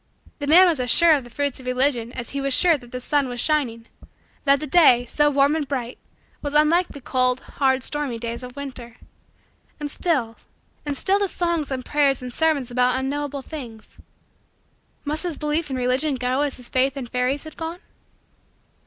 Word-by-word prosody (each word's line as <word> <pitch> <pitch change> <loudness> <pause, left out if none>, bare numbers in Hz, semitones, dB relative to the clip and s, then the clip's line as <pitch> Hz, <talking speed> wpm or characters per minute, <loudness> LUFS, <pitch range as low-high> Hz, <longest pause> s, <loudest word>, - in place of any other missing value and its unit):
The 285 - -4
man 350 +5 +7
was 330 -6 +1
as 250 -1 -1
sure 335 +7 +6
of 285 -3 +1
the 240 - -13
fruits 285 +2 -2
of 255 - -11
Religion 250 -2 +1
as 235 - -6
he 280 - -3
was 275 -1 +2
sure 345 -3 +5
that 245 -4 -11
the 250 - -5
sun 285 +2 0
was 245 0 -5
shining 240 -6 0 0.6
that 280 -1 +4
the 305 - -4
day, 265 -6 +5
so 295 +4 +2
warm 280 +1 +3
and 305 -3 -2
bright, 255 -3 -4 0.4
was 290 0 -4
unlike 330 +4 +4
the 285 - -11
cold, 255 0 0
hard, 265 -2 0
stormy, 290 -5 +2
days 235 +1 -5
of 250 0 -10
winter. 255 -5 -8 0.8
And 295 -1 -5
still 255 -12 -1 0.5
and 285 -1 -2
still 390 +1 +2
the 400 - +1
songs 340 -4 -2
and 260 -2 -4
prayers 280 -3 +2
and 250 -1 -7
sermons 295 -6 0
about 250 +1 +2
unknowable 280 +1 -3
things 240 -9 -10 1.1
must 300 +2 -1
his 345 -4 -2
belief 300 +1 -2
in 265 - -3
Religion 255 +4 0
go 255 +2 -1
as 290 -2 -2
his 250 -1 -10
faith 265 +2 0
in 265 - -4
fairies 250 +3 -1
had 315 -1 -11
gone? 330 +2 -6
275 Hz, 195 wpm, -22 LUFS, 250-300 Hz, 1.1 s, man